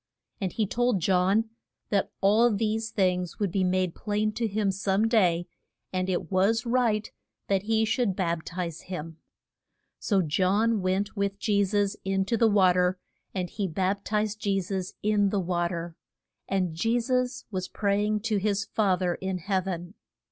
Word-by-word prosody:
And 190 -4 -2
he 220 - 0
told 245 0 +1
John, 190 +5 +2 0.4
that 200 -2 +1
all 215 +5 +5
these 220 +1 -1
things 180 -4 0
would 200 -4 -1
be 190 +1 +1
made 185 -1 +1
plain 215 0 -1
to 230 +2 -1
him 205 -1 0
some 195 +2 +1
day, 180 -7 +3 0.5
and 185 0 -1
it 180 -1 -2
was 210 +5 +2
right 235 -3 +1 0.4
that 195 -1 +2
he 220 +2 +1
should 220 -3 0
bap 170 -3 -1
tize 170 -2 -5
him. 165 -3 -6 0.8
So 195 -4 +1
John 195 +7 +2
went 190 +3 -1
with 200 -1 -1
Je 205 -1 +2
sus 205 0 0
in 195 0 0
to 230 - 0
the 230 0 +4
wa 190 -3 +5
ter, 180 +1 +2 0.4
and 180 -2 -1
he 205 +1 -3
bap 190 +4 -1
tized 215 0 -1
Je 200 -2 +1
sus 190 0 -4
in 205 -1 +3
the 200 - 0
wa 175 -1 0
ter. 170 -1 -5 0.5
And 185 -4 0
Je 225 +9 +1
sus 250 +1 -1
was 185 -2 -3
pray 200 0 0
ing 210 0 0
to 220 -1 0
his 200 0 0
Fa 200 -3 +2
ther 180 -2 +1
in 190 -1 -2
heav 190 +1 -1
en. 175 0 -4
195 Hz, 175 wpm, -27 LUFS, 185-215 Hz, 0.8 s, all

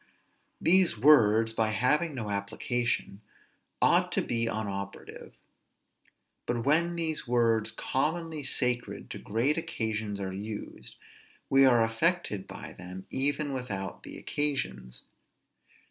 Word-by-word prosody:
These 180 - +4
words, 115 -4 +5
by 110 -1 +1
having 145 +8 +1
no 110 -5 -4
application, 110 +1 -2 0.6
ought - - +4
to - - +1
be 115 -1 -1
unoperative; 100 -3 -5 1.1
but 120 -1 -1
when 170 +4 +2 0.3
words 115 -2 +2
commonly 155 +7 -2
sacred 125 -3 -1
to - - -6
great 125 +9 0
occasions 110 -7 -3
are 95 -1 -4
used, 105 +2 -7 0.6
we 135 0 +6
are 120 -3 +5
affected 115 - 0
by - - -8
them 90 +1 -9
even 145 +1 0
without 100 -7 -4
the - - -9
occasions. 65 - -2
115 Hz, 110 wpm, -29 LUFS, 105-145 Hz, 1.1 s, we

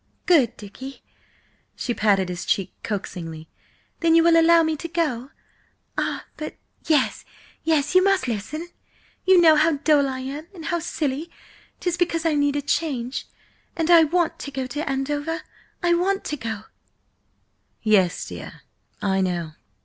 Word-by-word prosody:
"Good 290 -10 +4
Dicky!" 260 +7 -10 0.7
She 240 - -2
patted 200 -4 +2
his 180 0 -4
cheek 195 - 0
coaxingly. 165 -6 -5 0.5
"Then 330 -1 +4
you 330 - +6
will 335 0 +5
allow 330 0 +6
me 315 0 0
to 335 - -5
go–ah, 305 -6 -4
but 305 - -6 0.3
yes, 300 -5 +2 0.4
yes, 305 -2 +1
you 370 0 +6
must 390 -8 +2
listen! 300 - -4 0.6
You 375 -1 +7
know 320 -2 +7
how 315 +2 +4
dull 290 -1 +3
I 260 0 -4
am, 285 +5 -6
and 325 -3 -9
how 345 +1 0
silly–'tis 330 +3 -4
because 335 -2 0
I 325 - +3
need 285 -1 +2
a 290 - -1
change, 270 -4 -2 0.5
and 330 0 +1
I 335 -1 +9
want 340 +1 0
to - - -6
go 265 -2 -3
to 290 +4 -4
Andover. 290 +4 -2 0.4
I 345 0 +4
want 385 +3 +1
to 300 - -3
go!" 225 -6 -5 1.2
"Yes, 200 -6 +3
dear, - - -9 0.4
I 195 -1 +2
know. 175 -4 -1
295 Hz, 150 wpm, -23 LUFS, 240-330 Hz, 1.2 s, I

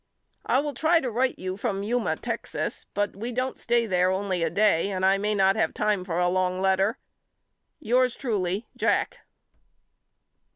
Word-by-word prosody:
I 265 - +3
will 295 0 -4
try 325 +3 +3
to 255 -6 -3
write 255 +3 0
you 185 0 -4
from 200 -3 -2
Yuma, 240 +3 0
Texas, - - -4
but 205 0 -1
we 230 +5 -5
don't 255 +2 -2
stay 235 0 +1
there 180 -3 +2
only 190 -1 -1
a 165 - +1
day 200 -3 +2
and 190 -1 -1
I 195 +1 +4
may 210 +1 0
not 195 0 +3
have 220 - 0
time 210 -3 0
for 175 -2 -3
a 180 0 +2
long 185 0 0
letter. 195 +5 +2 0.8
Yours 250 +2 +2
truly, 205 -4 -2
JACK. - - 0
205 Hz, 170 wpm, -26 LUFS, 185-240 Hz, 0.8 s, I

